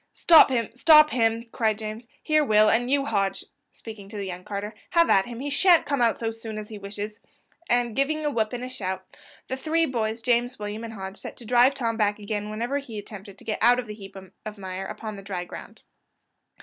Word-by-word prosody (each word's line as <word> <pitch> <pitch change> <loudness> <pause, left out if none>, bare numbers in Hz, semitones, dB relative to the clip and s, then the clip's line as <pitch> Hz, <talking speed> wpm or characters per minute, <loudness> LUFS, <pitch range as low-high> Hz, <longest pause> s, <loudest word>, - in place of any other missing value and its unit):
"Stop 330 -4 +7
him! 235 -4 0
stop 305 +4 +6
him!" 230 -1 +1
cried 220 -2 0
James. 220 +2 -7 0.2
"Here, 310 0 +3
Will 215 -4 +4
and 245 +2 +1
you, 275 0 +2
Hodge," 195 -6 -1 0.3
speaking 215 -3 -10
to 210 - -8
the 200 - -3
young 180 -1 -6
carter, 205 +2 -5 0.2
"have 335 -1 +4
at 195 +2 +4
him, 240 0 -7
he 285 +1 -3
shan't 350 +3 +5
come 280 -3 -1
out 235 -1 +3
so 225 -1 -2
soon 225 -1 -7
as 210 0 -6
he 215 -2 -8
wishes;" 205 +1 -6 0.5
and 240 -2 +1
giving 305 +3 0
a 295 - +1
whoop 220 -4 0
and 245 0 -5
a - - -4
shout, 190 -7 -4 0.4
the 260 - -4
three 320 +5 +1
boys, 225 -4 -2
James, 245 +1 +1
William, 210 +2 -5
and 225 -1 -7
Hodge, 190 -1 -7
set - - -9
to - - -10
to - - -12
drive 250 +3 +5
Tom 230 -4 -2
back 210 -2 +1
again 210 0 -4
whenever 235 +6 -2
he 240 -6 -9
attempted 200 -1 -9
to - - -15
get 215 - -2
out 245 +2 +6
of 250 - -3
the 210 - -7
heap 195 -2 -12 0.3
of 215 0 -7
mire 190 -1 -5
upon 215 0 -7
the - - -8
dry 190 -3 -5
ground. - - -11
225 Hz, 230 wpm, -25 LUFS, 210-250 Hz, 0.5 s, Stop